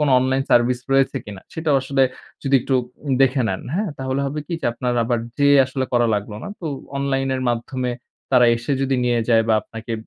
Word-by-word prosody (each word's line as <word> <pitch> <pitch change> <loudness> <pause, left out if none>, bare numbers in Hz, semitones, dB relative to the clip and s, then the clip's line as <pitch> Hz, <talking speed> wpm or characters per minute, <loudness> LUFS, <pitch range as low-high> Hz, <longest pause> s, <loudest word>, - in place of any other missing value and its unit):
কোনো 150 -2 +2
online 130 +1 +1
service 120 +1 +3
রয়েছে 135 0 +3
কিনা 100 -2 -9
সেটাও 160 -3 +1
আসলে 135 0 +1 0.4
যদি 135 -1 +1
একটু 135 - -4
উপ - - -7 0.4
দেখে 130 0 +3
নেন, 95 - -2
হ্যাঁ? 205 +2 0
তাহলে 130 +1 -2
হবে 140 +2 -4
কী - - -7
যে - - 0
আপনার 125 +1 -2
আবার 120 0 0 0.2
যেয়ে 145 0 +5
আসলে 130 0 -2
করা 120 -1 +3
লাগলো 105 +1 -4
না। - - -6
তো - - -8 0.3
online 135 -1 0
এর 130 - -2
মাধ্যমে 125 +2 -2 0.4
তারা 125 -2 +6
এসে 120 +5 -3
যদি 135 0 +1
নিয়ে 120 -1 +2
যায় 115 -1 +5
বা 110 - +4
আপনাকে 115 +1 -8
130 Hz, 210 wpm, -21 LUFS, 120-135 Hz, 0.4 s, তারা